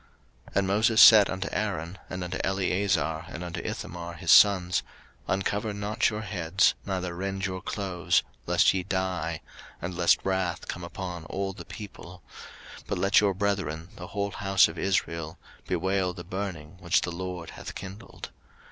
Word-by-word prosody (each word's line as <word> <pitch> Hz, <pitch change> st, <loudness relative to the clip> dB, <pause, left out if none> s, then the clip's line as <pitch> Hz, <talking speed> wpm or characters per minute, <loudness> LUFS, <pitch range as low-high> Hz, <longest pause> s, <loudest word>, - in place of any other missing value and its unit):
03:010:006 -, -, -17 dB
And 100 Hz, -1 st, +2 dB
Moses 110 Hz, +3 st, +3 dB
said 105 Hz, -3 st, +9 dB
unto 95 Hz, 0 st, -3 dB
Aaron, 95 Hz, -4 st, -2 dB
and 90 Hz, 0 st, -4 dB
unto 90 Hz, +1 st, -4 dB
Eleazar 95 Hz, -4 st, 0 dB
and 85 Hz, -, -7 dB
unto 85 Hz, -1 st, -5 dB
Ithamar, 85 Hz, 0 st, -5 dB
his 85 Hz, +1 st, 0 dB
sons, 90 Hz, -3 st, +6 dB, 0.5 s
Uncover 100 Hz, +3 st, -1 dB
not 105 Hz, +2 st, +1 dB
your 105 Hz, -1 st, -4 dB
heads, 95 Hz, -2 st, +2 dB
neither 90 Hz, -3 st, -2 dB
rend 95 Hz, +1 st, -3 dB
your 95 Hz, -1 st, -3 dB
clothes; 95 Hz, -4 st, 0 dB, 0.2 s
lest -, -, +4 dB
ye 95 Hz, -, 0 dB
die, 90 Hz, -4 st, -2 dB, 0.4 s
and 85 Hz, +1 st, -5 dB
lest 85 Hz, -1 st, +4 dB
wrath 95 Hz, -2 st, -1 dB
come 90 Hz, -, -5 dB
upon 85 Hz, -1 st, -6 dB
all 95 Hz, +3 st, -3 dB
the 100 Hz, -, -10 dB
people: 90 Hz, -4 st, -10 dB, 0.6 s
but -, -, -2 dB
let 100 Hz, +2 st, +4 dB
your 100 Hz, -2 st, +2 dB
brethren, 95 Hz, -5 st, -2 dB
the 90 Hz, -, -7 dB
whole 100 Hz, +1 st, -2 dB
house 95 Hz, -2 st, +4 dB
of 80 Hz, +1 st, -8 dB
Israel, 85 Hz, -4 st, -1 dB, 0.3 s
bewail 95 Hz, +1 st, 0 dB
the 90 Hz, -, -7 dB
burning 90 Hz, -3 st, -5 dB
which 85 Hz, -1 st, +2 dB
the 90 Hz, -, -3 dB
LORD 90 Hz, -1 st, -5 dB
hath -, -, -9 dB
kindled. 100 Hz, +4 st, -9 dB
95 Hz, 160 wpm, -27 LUFS, 85-100 Hz, 0.6 s, said